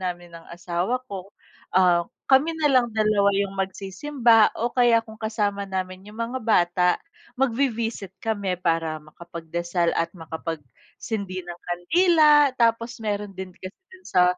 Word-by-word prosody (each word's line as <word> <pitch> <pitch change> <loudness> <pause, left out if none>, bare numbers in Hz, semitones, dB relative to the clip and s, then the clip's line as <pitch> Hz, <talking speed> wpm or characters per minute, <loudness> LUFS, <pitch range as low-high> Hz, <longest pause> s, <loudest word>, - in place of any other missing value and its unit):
namin 175 -1 -5
ng 165 0 -12
asawa 180 +8 -2
ko, 190 -2 -6 0.5
um, 175 -2 +4 0.2
kami 285 +5 +4
na 295 - +3
lang 255 -2 +4
2 215 -2 +3
yung 200 0 0
magsisimba, 215 +5 +2
o 240 +2 -1
kaya 240 -2 +4
kung 220 -1 -13
kasama 205 -2 -1
namin 185 0 -5
yung 210 +2 -12
mga 240 +3 -3
bata, 180 -4 +3 0.5
magvi-visit 230 -6 -1
kami 205 -4 -1
para 165 -3 -1
makapagdasal 170 +2 -3
at 165 - -1
makapagsindi 165 - -6
ng 175 0 -9
kandila, 295 - +4
tapos 230 -1 0
meron 205 -1 -3
din 190 0 -7
kasi 185 +1 -8 0.2
do'n 375 -1 -16
sa, 180 - +3
200 Hz, 140 wpm, -24 LUFS, 175-230 Hz, 0.5 s, um